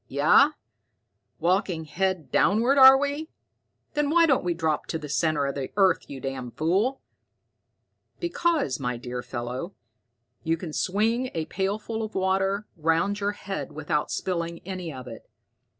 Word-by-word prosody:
"Yeah? 165 - +5 0.9
Walking 180 -2 0
head 185 0 -2
downward, 240 +8 +3
are 265 0 +10
we? 285 +3 -2 0.6
Then 295 -1 0
why 335 +2 +5
don't 275 -5 +2
we 175 -1 -1
drop 160 -2 -1
to 160 - -2
the 155 -2 -7
center 150 0 +1
of 140 - -2
the 135 -2 -4
earth, 190 -2 +3
you 140 - -7
damn 130 -2 -5
fool?" 195 - 0 1.2
"Because, 340 - 0
my 125 -3 -2
dear 125 +1 -5
fellow, 125 +9 -5 0.7
you 165 +1 0
can 165 -2 -7
swing 225 +9 0
a 160 -1 -1
pailful 205 +6 -3
of 220 -1 -5
water 195 +2 0
round 165 +5 +1
your 205 0 -1
head 195 -6 -6
without 150 0 -1
spilling 170 -2 -3
any 185 -3 -5
of 130 -3 -8
it. 115 -2 -11
180 Hz, 150 wpm, -26 LUFS, 150-215 Hz, 1.2 s, are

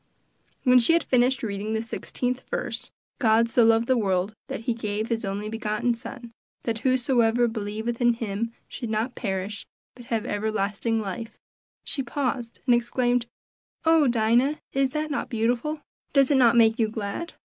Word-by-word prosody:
When 250 -1 +6
she 245 +7 +4
had 335 -2 +3
finished 255 +1 +2
reading 210 0 -3
the 220 - 0
sixteenth 245 +2 -3
verse - - -2 0.3
"God 230 -2 +4
so 235 +1 +4
loved 225 0 +4
the 255 0 +2
world 190 -1 0
that - - -5
he 235 +1 0
gave 215 -1 -3
his 230 0 -1
only 200 +1 -3
begotten 220 +2 -1
Son, 235 +1 -7 0.3
that 225 -1 -2
whosoever 245 -2 +2
believeth 225 +2 -3
in 240 0 +5
him 225 0 -3 0.2
should 240 -3 -6
not 220 +3 -1
perish, 195 -1 -4 0.3
but 245 -1 -13
have 230 -1 -1
everlasting 215 +1 -1
life," 220 +2 -5 0.5
she 275 - -2
paused 250 -2 -3
and 250 - +5
exclaimed, 240 0 +1 0.6
"Oh! 325 -2 +5
Aunt 245 - +2
Dinah, 240 +7 +3
is 270 -1 +2
not 305 0 -1
that 285 - -2
beautiful? 245 +6 -1 0.3
Does 275 0 +4
it - - +5
not 240 -3 +5
make 225 +1 +5
you 220 -1 +2
glad? 215 +10 -5
230 Hz, 165 wpm, -25 LUFS, 220-250 Hz, 0.6 s, When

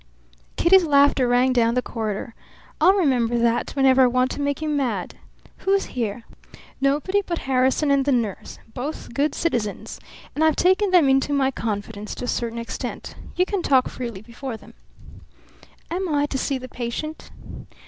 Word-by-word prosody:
Kitty's 370 +2 +5
laughter 280 -4 +4
rang 250 +1 +3
down 235 -1 +2
the 250 - +2
corridor. 220 0 -4 0.5
"I'll 380 - +6
remember 250 - +1
that 235 0 +1
whenever 265 -1 +4
I 255 - +6
want 255 +1 +1
to - - -4
make 285 -1 -1
you 310 - -3
mad. 260 -11 -1 0.4
Who's 390 0 +1
here?" 230 -2 -3 0.6
"Nobody 295 +9 +1
but 345 -3 -4
Harrison 265 +2 +2
and 280 -1 +3
the 285 - +1
nurse. 230 -6 -2 0.2
Both 280 0 -6
good 285 +3 0
citizens, 235 -11 -2 0.3
and 310 - 0
I've 315 -2 +4
taken 375 +3 +3
them 355 -6 +5
into 270 +2 +2
my 270 -1 +2
confidence 210 -2 -5
to - - -5
a - - -6
certain 235 -1 -2
extent. 230 0 -6 0.2
You 365 - +2
can 395 -1 -2
talk 265 -5 +3
freely 235 -6 -6
before 240 +1 -7
them." - - -17 1.2
"Am 365 +1 -2
I 290 -1 +1
to 280 - -3
see 275 - -1
the 255 0 -8
patient?" 255 +6 -6
265 Hz, 170 wpm, -23 LUFS, 235-300 Hz, 1.2 s, I'll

